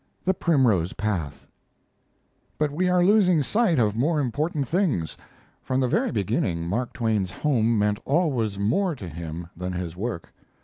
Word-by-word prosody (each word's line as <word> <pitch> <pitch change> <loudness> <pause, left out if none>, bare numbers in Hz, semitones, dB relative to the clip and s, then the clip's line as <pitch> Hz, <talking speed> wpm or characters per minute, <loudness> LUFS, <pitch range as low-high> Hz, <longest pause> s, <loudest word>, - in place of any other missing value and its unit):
THE 190 - +3
PRIMROSE 125 - +2
PATH 95 -9 -3 1.1
But 150 -1 0
we 180 +5 0
are 180 -1 +3
losing 185 -6 +4
sight 210 - +2
of 110 -4 +2
more 150 +7 +1
important 145 +2 -1
things. 160 - 0 0.5
From 130 - -1
the 130 - +2
very - - +1
beginning 90 -5 -1
Mark 115 +7 -2
Twain's 110 -5 0
home 115 0 +1
meant 105 +1 +1
always 130 - 0
more 150 - +1
to 100 -8 -8
him 85 +1 -7
than 90 +1 -4
his 90 -2 -4
work. 100 -3 -5
120 Hz, 150 wpm, -25 LUFS, 95-155 Hz, 1.1 s, losing